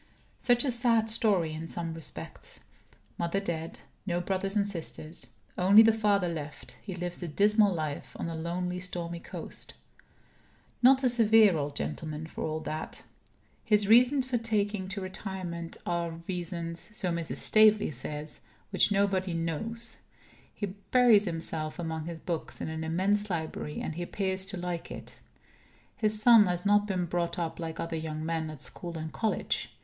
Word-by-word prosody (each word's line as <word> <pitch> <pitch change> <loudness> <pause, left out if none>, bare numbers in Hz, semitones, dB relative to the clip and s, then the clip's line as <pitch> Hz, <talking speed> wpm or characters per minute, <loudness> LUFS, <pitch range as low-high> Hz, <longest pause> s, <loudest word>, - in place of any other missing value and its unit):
Such 245 +1 +4
a 265 - +2
sad 230 -2 +2
story, 195 -9 +2
in 160 +1 -5
some 165 -1 -4
respects. 160 -1 -7 0.6
Mother 170 +3 0
dead; 165 -4 -4 0.3
no 175 -1 0
brothers 195 +3 -1
or 200 - +3
sisters. 165 -4 -6 0.3
Only 200 +5 +8
the 225 0 +5
father 205 -4 +2
left; 155 -3 -6
he 190 -4 -6
lives 175 0 -4
a 175 - -3
dismal 205 +5 +4
life 155 -4 -4
on - - -2
a 165 - -4
lonely 180 +2 -3
stormy 175 -2 -4
coast. - - -7 1.1
Not 265 +2 +6
a - - +5
severe 220 -5 +5
old 145 -2 -2
gentleman, 155 +1 -3
for 160 - -6
all 155 0 -2
that. 155 0 -5 0.6
His 210 -2 +3
reasons 250 +4 +6
for 255 -2 0
taking 210 -4 -1
to 195 0 -2
retirement 185 -3 -5
are 170 -1 -2
reasons 170 -2 -4 0.2
(so 185 -6 0
Mrs. 170 -1 -2
Staveley 215 -3 +5
says) 150 +3 -4 0.2
which - - +3
nobody 195 -3 +1
knows. 220 +9 -3 0.5
He 205 - -4 0.2
buries 240 -5 +6
himself 160 -3 -2
among 160 -2 -4
his 170 -1 -6
books, 165 -2 -4
in - - -3
an 160 0 -4
immense 195 +6 +1
library; 160 -3 -3
and - - -3
he 170 - -5
appears 190 +1 -1
to 195 - -4
like 175 -1 -4
it. - - -9 0.8
His 215 -1 +2
son 220 -2 +7
has 180 +1 -1
not 205 0 +4
been 185 -3 0
brought 170 0 -1
up 165 -2 -3
like 165 -1 -5
other 165 -1 -3
young 155 -1 -4
men, 160 -1 -2
at 150 -3 -7
school 170 +6 -3
and 160 0 -6
college. 220 -2 -2
180 Hz, 165 wpm, -29 LUFS, 165-210 Hz, 1.1 s, Only